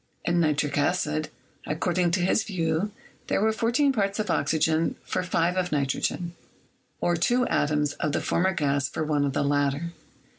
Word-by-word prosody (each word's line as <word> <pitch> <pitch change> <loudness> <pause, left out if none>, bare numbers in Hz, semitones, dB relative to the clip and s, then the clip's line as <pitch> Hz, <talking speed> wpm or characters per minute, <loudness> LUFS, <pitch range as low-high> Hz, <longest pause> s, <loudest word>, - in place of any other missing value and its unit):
In 175 0 +2
nitric 150 -2 +1
acid, 155 -1 0 0.4
according 175 +3 +1
to 180 +2 +1
his 185 +3 +2
view, 170 -1 -1 0.4
there - - +1
were 220 +2 +3
14 240 +6 +2
parts 200 -4 0
of 215 -1 -1
oxygen 160 +2 +1
for - - -2
5 180 -1 0
of 180 -1 0
nitrogen, 150 +4 -1 0.7
or 175 - +1
two 245 +9 +2
atoms 150 0 +1
of 150 - -2
the - - 0
former 190 +2 +1
gas 140 -3 0
for 160 - -3
one 150 -2 +1
of 140 - -1
the - - +1
latter. 145 +3 0
165 Hz, 170 wpm, -26 LUFS, 150-185 Hz, 0.7 s, were